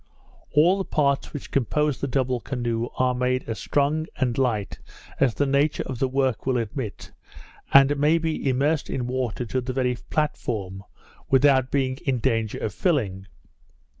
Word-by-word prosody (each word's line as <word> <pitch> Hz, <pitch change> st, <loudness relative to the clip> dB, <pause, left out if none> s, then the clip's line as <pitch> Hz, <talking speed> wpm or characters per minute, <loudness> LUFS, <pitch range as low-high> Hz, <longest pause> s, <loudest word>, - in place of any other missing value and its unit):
All 175 Hz, +6 st, +4 dB
the -, -, 0 dB
parts 140 Hz, -5 st, 0 dB
which 145 Hz, -, -8 dB
compose 145 Hz, +2 st, 0 dB
the 140 Hz, -, -1 dB
double 130 Hz, -1 st, 0 dB
canoe, 120 Hz, -2 st, -2 dB
are 130 Hz, 0 st, +2 dB
made 125 Hz, 0 st, 0 dB
as 115 Hz, -2 st, -4 dB
strong 150 Hz, +2 st, 0 dB
and 125 Hz, -3 st, 0 dB
light 115 Hz, -7 st, -1 dB, 0.4 s
as 125 Hz, -5 st, +2 dB
the 145 Hz, -, +1 dB
nature 140 Hz, +2 st, +1 dB
of 130 Hz, -3 st, -5 dB
the 135 Hz, -, +2 dB
work 130 Hz, -2 st, -1 dB
will 130 Hz, -1 st, +2 dB
admit, 115 Hz, -1 st, -5 dB, 0.6 s
and 140 Hz, +1 st, +7 dB
may 150 Hz, +3 st, +4 dB
be 160 Hz, -3 st, -2 dB
immerged 140 Hz, +4 st, +1 dB
in 125 Hz, -, -2 dB
water 125 Hz, -1 st, -2 dB
to 130 Hz, +3 st, -2 dB
the 130 Hz, +1 st, -4 dB
very 125 Hz, -1 st, 0 dB
platform, 105 Hz, -10 st, -2 dB, 0.5 s
without 135 Hz, -1 st, +4 dB
being 130 Hz, -2 st, 0 dB
in 135 Hz, -4 st, -1 dB
danger 115 Hz, -3 st, 0 dB
of 110 Hz, -, -3 dB
filling. 100 Hz, -, -1 dB
130 Hz, 165 wpm, -24 LUFS, 120-140 Hz, 0.6 s, and